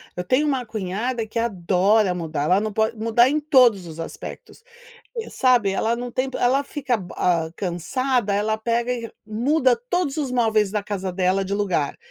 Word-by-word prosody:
eu 180 - -3
tenho 255 +10 +2
uma 260 -4 0
cunhada 220 +4 -3
que 225 +2 -4
adora 195 -1 +2
mudar, 160 -4 -3
ela 180 +6 +3
não 215 0 -2
pode 220 +1 0
mudar 230 +3 +3
em 305 +2 +1
todos 250 - +4
os 160 0 -10
aspectos, 165 - -8 0.7
sabe? 245 -6 +3
Ela 225 +4 0
não 245 +1 -5
tenta, 255 +2 -2
ela 265 +3 +2
fica 275 -3 -2 0.2
a 170 -3 +1
cansada, 205 +6 -1
ela 215 +2 0
pega 235 +2 -1
e 240 - -4
re 230 - -7
muda 250 +4 +2
todos 330 -4 0
os 280 -4 -2
móveis 220 -5 +2
da 210 -1 -1
casa 195 -2 -3
dela 185 +1 +1
de 195 - -3
lugar. 185 -8 -1
220 Hz, 180 wpm, -23 LUFS, 190-250 Hz, 0.7 s, todos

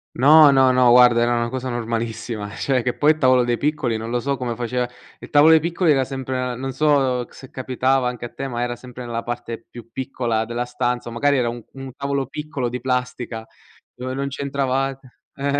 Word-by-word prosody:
No, 150 +3 +7
no, 130 -1 +4
no, 125 -1 +5
guarda 120 -1 +6
era 120 0 +2
una 120 0 -1
cosa 130 +1 -4
normalissima, 115 -2 -3
cioè 130 -2 0
che 125 +1 -2
poi 150 +1 +4
il 155 - -1
tavolo 130 -3 +4
dei 120 -1 0
piccoli 140 -6 -1
non 110 +1 -6
lo 120 +1 0
so 140 +3 -1
come 120 -2 -3
faceva 125 +1 -2 0.3
il - - -11
tavolo 150 +2 +6
dei 160 - +7
piccoli 170 +1 +1
era 135 -2 +2
sempre 130 -1 -3
non 135 +2 -4
so 135 -3 +1
se 130 - -13
capitava 130 0 0
anche 125 -1 -4
a 120 - -10
te, 135 - -5
ma 120 -2 -3
era 120 0 -2
sempre 125 0 -10
nella 115 -1 -3
parte 120 -1 -6
più 115 -1 -12
piccola 120 -3 -2
della 120 +1 -3
stanza 125 0 -2
o - - -8
magari 140 +4 +2
era 120 -2 +1
un 120 0 -7
un 135 -1 -8
tavolo 140 -1 -2
piccolo 140 -2 -4
di 125 +1 -4
plastica 125 -3 -3 0.5
dove 130 +1 -5
non 140 +1 -2
c'entravat 135 -1 -2 0.4
eh 140 +1 -1
125 Hz, 210 wpm, -21 LUFS, 120-135 Hz, 0.5 s, No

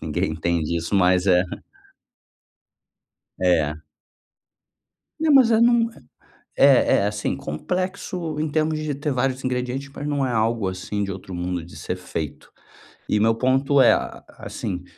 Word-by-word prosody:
Ninguém - - -1
entende 85 0 -1
isso, 85 +4 -3
mas 90 -1 +3
é. 90 -2 +5 2.0
É. 85 -5 +2 1.4
Né, 320 - 0
mas 265 -5 +6
é 225 -1 +4
não 235 -1 +4
é - - -17 0.6
é 135 -2 +5
é 100 - +1
assim 105 0 -2
complexo 180 - -4
em 155 - 0
termos 155 +1 0
de 155 -1 -3
ter 145 +1 -2
vários 130 +1 -1
ingredientes, 130 +2 -3
mas 145 - -6
não 140 -2 0
é 125 - -2
algo 110 -2 0
assim 95 +2 -3
de 100 - -4
outro 95 0 -9
mundo 90 -1 -3
de 85 - -13
ser 80 +4 -4
feito 80 -4 -6 0.6
e 105 - +1
meu 110 +1 +3
ponto 135 +3 +2
é 125 - +7
a - - -4
a - - -14
assim, 90 -2 -5
115 Hz, 155 wpm, -23 LUFS, 90-145 Hz, 2.0 s, é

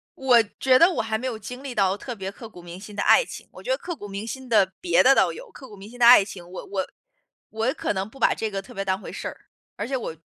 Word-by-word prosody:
我 250 -3 +4 0.2
觉 255 -1 +5
得 335 - +7
我 360 - -1
还 220 0 -2
没 255 +4 -4
有 240 -3 -4
经 250 +4 -9
历 265 -3 -6
到 195 -1 +2
特 245 +3 -7
别 195 -2 -5
刻 225 +2 -11
骨 180 - -13
铭 175 +1 -10
心 205 +1 -11
的 205 - -1
爱 - - +5
情。 - - -10
我 - - -13
觉 - - -8
得 - - +2
刻 345 - -6
骨 205 - -9
铭 200 +2 -6
心 260 +3 -7
的 205 -5 +3
别 360 - +3
的 270 - +7
倒 - - +3
有， - - -11
刻 265 - -12
骨 210 - -13
铭 200 +1 -12
心 245 +1 -14
的 240 - +5
爱 235 -4 +9
情， 185 -3 -10
我 185 - -8
我 190 -2 -3 0.6
我 225 +4 -1
可 - - -2
能 190 +1 -3
不 270 - -16
把 - - +4
这 220 - -3
个 195 -1 -4
特 195 - -14
别 195 0 -4
当 190 0 0
回 - - -9
事 - - -6
儿。 - - -7 0.4
而 205 - -3
且 265 +1 -1
我 195 -9 -5
220 Hz, 325 characters per minute, -24 LUFS, 195-260 Hz, 0.6 s, 爱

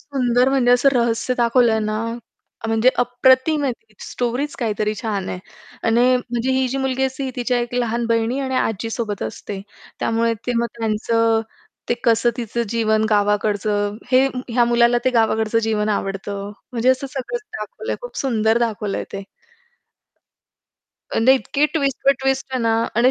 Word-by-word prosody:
सुंदर 250 -3 +1
म्हणजे 265 -2 +2
असं 250 +3 +5
रहस्य 235 0 +1
दाखवलंय 235 -1 +3
ना 215 0 -1 0.7
अ, - - -3
म्हणजे 225 +2 +3
अप्रतिम 260 +5 +3
आहे 265 - +1
ती 445 - -19
स्टोरीच 250 +4 -2
काहीतरी 215 -3 -1
छान 205 -4 -2
आहे. - - -4 0.4
आणि 230 +1 +2 0.2
म्हणजे 245 0 -2
ही 260 0 +2
जी 270 +2 -2
मुलगी 265 -1 -1
असते, 265 +1 -3
ही 265 - -3
तिच्या 245 0 0
एक 240 0 -3
लहान 235 -1 0
बहिणी 230 +2 +1
आणि 260 -1 -2
आजीसोबत 225 -3 -2
असते. 195 - -6 0.4
त्यामुळे 230 0 +1
तेव्हा 235 -1 +1
त्यांचं 225 +1 +1 0.5
ते 240 - +2
कसं 230 0 +3
तिचं 235 -1 -2
जीवन 220 -1 +1
गावाकडचं, 205 0 +1 0.2
हे 260 +1 +6 0.2
ह्या 240 0 +3
मुलाला 235 0 +3
ते 255 - +3
गावाकडचं 225 -1 +2
जीवन 210 -1 0
आवडतं 200 0 -3 0.2
म्हणजे 240 +1 0
असं 260 +1 0
सगळंच 280 - -4 0.2
दाखवलंय. - - -5
खूप - - -9
सुंदर 225 -4 +1
दाखवलंय 215 -4 -2
ते. 195 - -5 1.9
म्हणजे 235 +4 +5
इतकी 275 +2 0
ट्विस्ट 275 -5 -1
वर 275 - +8
ट्विस्ट 270 0 0
आहे 255 - -1
ना 225 -1 +2 0.2
आणि 245 +2 +5
235 Hz, 155 wpm, -21 LUFS, 220-255 Hz, 1.9 s, वर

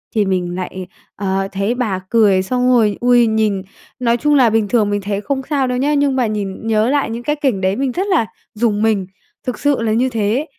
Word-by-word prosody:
thì 210 - +2
mình 180 -2 -1
lại, 185 0 -5 0.3
ờ, 195 -1 -1
thấy 200 +4 -1
bà 215 -7 -1
cười 205 -5 +3
xong 250 +4 0
rồi, 220 -5 +3
ui, 245 -1 +4
nhìn 215 -3 +1 0.4
nói 235 -1 +2
chung 295 +3 +2
là 255 -5 +5
bình 220 -1 +1
thường 215 -2 +2
mình 205 0 -1
thấy 200 +1 -3
không 275 +3 -2
sao 275 -3 +1
đâu 250 0 -1
nhá, 290 +3 +1
nhưng 285 -2 +2
mà 250 -3 +1
nhìn 210 0 -4
nhớ 220 +2 +2
lại 285 -4 +1
những 235 +1 -5
cái 295 +4 0
cảnh 255 -10 0
đấy 190 +1 +1
mình 270 +1 -1
rất 375 +10 -2
là 360 - +2 0.3
rùng 215 -1 0
mình, 210 -4 +1 0.4
thực 250 - -3
sự 285 -4 +1
là 220 -1 0
như 255 +3 +2
thế. 225 +5 0
225 Hz, 230 wpm, -17 LUFS, 200-255 Hz, 0.4 s, là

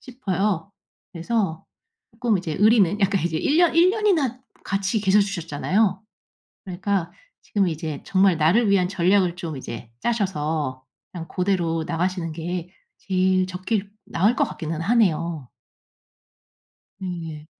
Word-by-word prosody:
싶어요. 200 -6 -2 0.4
그래서 175 -1 -2 0.5
쪼끔 230 -6 0
이제 160 -4 -4
의리는 205 -2 +4
약간 195 -2 +2
이제 165 -2 -1
1 295 - +1
년, 345 -2 +4
1 355 +2 +6
년이나 335 - +1 0.2
같이 200 +2 -1
계셔주셨잖아요. 195 0 +1 0.6
그러니까 190 -1 -2 0.3
지금 200 -3 0
이제 155 -2 -4
정말 190 -3 +3
나를 200 +8 +3
위한 185 -2 +3
전략을 185 -1 +2
좀 165 -5 -5
이제 115 -2 -8
짜셔서 155 - -1 0.3
그냥 165 -2 -7
고대로 175 -4 0
나가시는 175 0 -1
게 175 +2 -4 0.3
제일 185 -1 +1
적기일 195 +2 -3
나을 205 +8 +2
것 - - +3
같기는 160 -1 -5
하네요. 170 - +1 1.5
예예. 165 -5 -6
185 Hz, 270 characters per minute, -23 LUFS, 165-205 Hz, 1.5 s, 1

